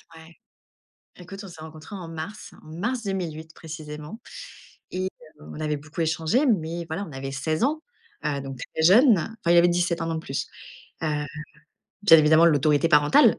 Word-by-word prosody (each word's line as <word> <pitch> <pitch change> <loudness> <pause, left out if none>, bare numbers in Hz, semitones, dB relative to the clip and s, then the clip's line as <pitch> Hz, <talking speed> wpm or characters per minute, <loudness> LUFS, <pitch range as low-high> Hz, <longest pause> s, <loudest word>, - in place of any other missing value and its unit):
Ouais. 160 +1 -15 0.8
Écoute, 195 +2 -10
on - - -9
s'est 165 -3 -12
rencontré 160 +4 -10
en 175 -4 -7
mars, 165 +6 -7
en - - -17
mars 230 +10 -3
2008 160 -5 -4
précisément 155 +4 -8 0.7
et 185 +1 -3 0.4
heu, - - -13
on 155 - -8
avait 150 -1 -1
beaucoup 155 +3 -8
échangé 165 - +1
mais 170 -6 0
voilà, 185 +6 -3
on - - -11
avait 135 0 -5
16 155 +5 -2
ans, 310 +3 0 0.4
heu, 145 -2 -1
donc 135 -1 -7
très 160 - -5
jeunes, 215 - +7
enfin, 205 0 -3
il - - +5
avait 175 +1 +6
17, 175 -1 0
1 165 0 -2
an - - -1
de 160 - -3
plus, 135 -3 -4 0.6
heu, - - +1 1.0
bien 165 -6 +8
évidemment 155 +2 +6
l'autorité 150 +1 +3
parentale, 150 -1 +5
160 Hz, 180 wpm, -25 LUFS, 155-180 Hz, 1.0 s, bien